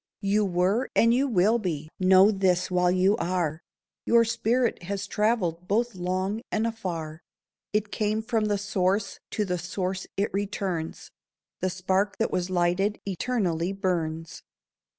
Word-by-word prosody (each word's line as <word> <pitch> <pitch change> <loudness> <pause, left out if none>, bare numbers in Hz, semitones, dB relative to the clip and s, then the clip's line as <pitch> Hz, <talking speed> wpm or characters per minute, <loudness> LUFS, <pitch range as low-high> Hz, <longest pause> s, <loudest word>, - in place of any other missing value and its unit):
You 205 +1 +2
were, 190 +6 +1
and 230 +1 +5
you 265 +3 +2
will 220 0 +3
be: 160 -7 -3
know 190 +2 +6
this 190 -3 +1
while 180 0 +3
you 185 +3 +3
are. 170 -4 -1 0.4
Your 230 0 +4
spirit 230 +1 0
has 195 +3 -4
travelled 200 -5 0
both 235 +4 +1
long 185 +4 -2
and 220 +1 +1
afar. 170 -8 -4 0.5
It 210 0 -1
came 215 +1 -1
from 225 -2 0
the 205 -1 +1
Source, 195 0 -1
to 210 - -1
the 180 -2 -2
Source 185 +1 -3
it 200 +2 0
returns; 195 -4 -3 0.5
The 185 - 0
spark 190 +3 0
that 225 - 0
was 180 0 -1
lighted, 185 +3 +1
eternally 190 -3 -1
burns. 165 -4 -2
195 Hz, 145 wpm, -26 LUFS, 180-215 Hz, 0.5 s, know